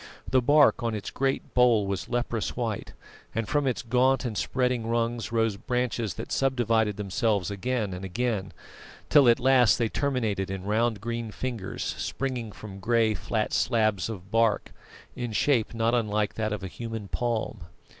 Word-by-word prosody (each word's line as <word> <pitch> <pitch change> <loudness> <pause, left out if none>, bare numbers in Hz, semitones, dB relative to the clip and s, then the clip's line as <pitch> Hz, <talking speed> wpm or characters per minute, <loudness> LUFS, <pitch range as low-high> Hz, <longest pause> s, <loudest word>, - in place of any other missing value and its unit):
The 130 0 +3
bark 145 +2 +5
on 115 -2 -1
its 105 - -5
great 135 0 -1
bole 120 -4 +4
was 95 -5 -3
leprous 120 -2 -2
white; 115 -4 -3 0.4
and 115 -1 -1
from 145 -2 +1
its 125 - -1
gaunt 130 +3 +2
and 115 -3 -3
spreading 125 0 0
rungs 115 0 -1
rose 115 -3 +1
branches 125 -3 -2
that - - -7
subdivided 115 -6 +1
themselves 105 -1 0
again 105 0 -2
and 90 +1 -6
again, 100 0 -2 0.6
till 140 -5 +7
at 115 - +4
last 130 -2 +5
they 115 -2 0
terminated 110 -10 -1
in 95 -1 -4
round 110 +1 0
green 115 0 -3
fingers, 115 -4 -4 0.2
springing 125 -5 -3
from 100 -1 -10
grey, 115 +1 +2
flat 110 +2 -2
slabs 110 -4 +1
of 100 -3 -8
bark, 115 -2 +2 0.4
in 120 -3 -4
shape 120 -1 +2
not 115 +1 +1
unlike 105 -3 0
that 110 -1 -2
of 105 -2 -4
a - - -3
human 115 +1 -6
palm. 110 -5 -2
115 Hz, 165 wpm, -27 LUFS, 105-125 Hz, 0.6 s, till